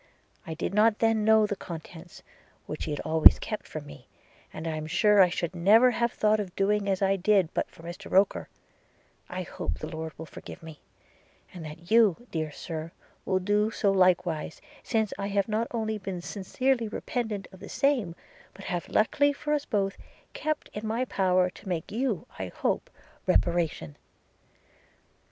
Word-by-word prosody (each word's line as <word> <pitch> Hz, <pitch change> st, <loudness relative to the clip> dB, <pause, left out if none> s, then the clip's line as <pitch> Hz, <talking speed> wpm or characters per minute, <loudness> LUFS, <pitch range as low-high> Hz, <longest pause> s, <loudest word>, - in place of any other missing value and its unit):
– -, -, -31 dB
I 160 Hz, -, -4 dB
did 170 Hz, -, -3 dB
not 210 Hz, +1 st, +4 dB
then 225 Hz, -1 st, +2 dB
know 220 Hz, 0 st, +5 dB
the 205 Hz, -1 st, -2 dB
contents, 170 Hz, -1 st, -10 dB, 0.4 s
which -, -, -6 dB
she -, -, -5 dB
had 150 Hz, -, -2 dB
always 160 Hz, 0 st, +7 dB
kept 215 Hz, -, -5 dB
from 155 Hz, -2 st, -7 dB
me: 145 Hz, -3 st, -13 dB, 0.4 s
and 155 Hz, -, -7 dB
I 160 Hz, -1 st, -2 dB
am 155 Hz, 0 st, -4 dB
sure 205 Hz, +4 st, +5 dB
I 180 Hz, -, +6 dB
should 175 Hz, 0 st, -3 dB
never 215 Hz, +8 st, +6 dB
have 235 Hz, 0 st, 0 dB
thought 215 Hz, 0 st, +2 dB
of 190 Hz, -4 st, -5 dB
doing 200 Hz, 0 st, +1 dB
as 195 Hz, 0 st, +1 dB
I 195 Hz, 0 st, +3 dB
did 190 Hz, -2 st, +2 dB
but -, -, -1 dB
for 165 Hz, -, -16 dB
Mr 170 Hz, +1 st, -8 dB
Roker 195 Hz, +1 st, +2 dB, 0.4 s
– -, -, -36 dB
I -, -, -2 dB
hope 180 Hz, +1 st, -4 dB
the -, -, -6 dB
Lord 160 Hz, -2 st, -6 dB
will 160 Hz, -, -7 dB
forgive 165 Hz, -, -11 dB
me! 160 Hz, -2 st, -10 dB, 0.4 s
– -, -, -31 dB
and 175 Hz, -3 st, -8 dB
that 165 Hz, +4 st, -10 dB
you, 225 Hz, -1 st, +4 dB
dear 155 Hz, -2 st, -2 dB
Sir, 160 Hz, +1 st, -6 dB, 0.3 s
will 190 Hz, -, +1 dB
do 205 Hz, +3 st, +1 dB
so 205 Hz, -2 st, +1 dB
likewise, 180 Hz, -4 st, +2 dB, 0.2 s
since 220 Hz, -3 st, 0 dB
I 200 Hz, -, -2 dB
have 200 Hz, -1 st, 0 dB
not 220 Hz, +2 st, 0 dB
only 220 Hz, -2 st, -2 dB
been 190 Hz, -2 st, -5 dB
sincerely 235 Hz, +6 st, -1 dB
repentant 215 Hz, -2 st, -3 dB
of 190 Hz, -, -14 dB
the -, -, -10 dB
same, 245 Hz, -12 st, +1 dB, 0.4 s
but 195 Hz, -, -11 dB
have, 175 Hz, -2 st, -3 dB
luckily 285 Hz, +6 st, +3 dB
for 295 Hz, +1 st, -2 dB
us 290 Hz, -1 st, 0 dB
both, 195 Hz, -2 st, -1 dB, 0.4 s
kept 310 Hz, -1 st, -2 dB
it -, -, -4 dB
in 220 Hz, -, -5 dB
my 230 Hz, +4 st, 0 dB
power 185 Hz, -5 st, +2 dB
to 190 Hz, -, -11 dB
make 170 Hz, -3 st, -3 dB
you, 230 Hz, -4 st, -1 dB
I 95 Hz, -, -3 dB
hope, -, -, -2 dB, 0.4 s
reparation. 165 Hz, -, +1 dB
195 Hz, 185 wpm, -28 LUFS, 170-215 Hz, 0.4 s, always